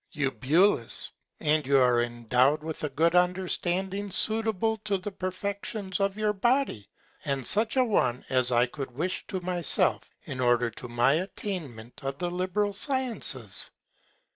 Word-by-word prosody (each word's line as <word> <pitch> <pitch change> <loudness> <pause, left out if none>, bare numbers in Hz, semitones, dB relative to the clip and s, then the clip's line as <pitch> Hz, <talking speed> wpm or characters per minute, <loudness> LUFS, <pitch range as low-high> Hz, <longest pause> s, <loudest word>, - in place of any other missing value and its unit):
Eu. 140 -2 0 1.1
And 150 -2 +1
you 140 0 +4
are 125 -2 +4
endow'd 125 +5 +1
with 160 -1 -6
a 150 - -1
good 165 +5 +2
Understanding 185 +2 +1
suitable 220 +1 +1
to 205 -2 -1
the 190 +2 -6
Perfections 195 +1 -4
of 195 0 0
your 215 -1 +1
Body, 240 - 0 0.3
and 135 -3 -2
such 220 - +2
a 260 - +5
one 130 - 0
as 130 -1 +3
I 120 0 +4
could 135 +2 -6
wish 160 +9 -3
to 190 - -3
myself, 175 -2 +1
in 130 - -6
order 120 -1 +2
to 125 - -9
my 120 +3 +3
Attainment 150 - -6
of 135 0 -3
the 175 +2 -2
liberal 185 +3 -1
Sciences. 225 - 0
175 Hz, 145 wpm, -27 LUFS, 130-200 Hz, 1.1 s, a